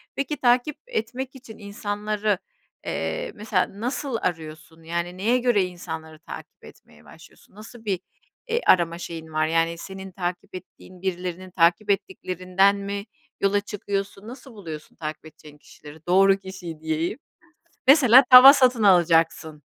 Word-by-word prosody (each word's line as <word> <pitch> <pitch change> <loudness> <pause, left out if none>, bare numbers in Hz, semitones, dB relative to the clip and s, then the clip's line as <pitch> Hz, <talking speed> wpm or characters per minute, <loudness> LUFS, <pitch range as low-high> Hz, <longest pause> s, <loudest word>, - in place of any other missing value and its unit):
Peki, 280 +1 -3
takip 250 +3 +2
etmek 260 - -4
için 240 -4 -12
insanları 205 0 -2 1.0
mesela 205 -1 -2
nasıl 250 0 -2
arıyorsun 160 -1 -5
yani 170 +2 -4
neye 230 +6 +2
göre 240 -5 +2
insanları 160 -3 -8
takip - - -11
etmeye - - -18
başlıyorsun, - - -18
nasıl 220 +2 -13
bir, 190 -3 -1 0.5
e, 470 0 -1
arama 170 - +3
şeyin 165 -2 -8
var 155 0 +1
yani 165 +1 0
senin 190 +2 -9
takip 175 0 -5
ettiğin 185 0 -13
birilerinin 185 0 -4
takip 175 +4 +2
ettiklerinden 190 0 0
mi 200 0 -5 0.4
yola 200 +1 +2
çıkıyorsun, 200 0 -5
nasıl 255 +1 -11
buluyorsun 160 -8 -9
takip 155 -1 -7
edeceğin 150 -1 -15
kişileri, 150 +1 -15
doğru 195 +2 +5
kişiyi 190 -5 -9
diyeyim, 160 - -2 0.7
mesela 265 -2 +8
tava 255 +2 +11
satın 250 -5 +3
alacaksın, 165 -4 +2
190 Hz, 130 wpm, -24 LUFS, 170-215 Hz, 1.0 s, tava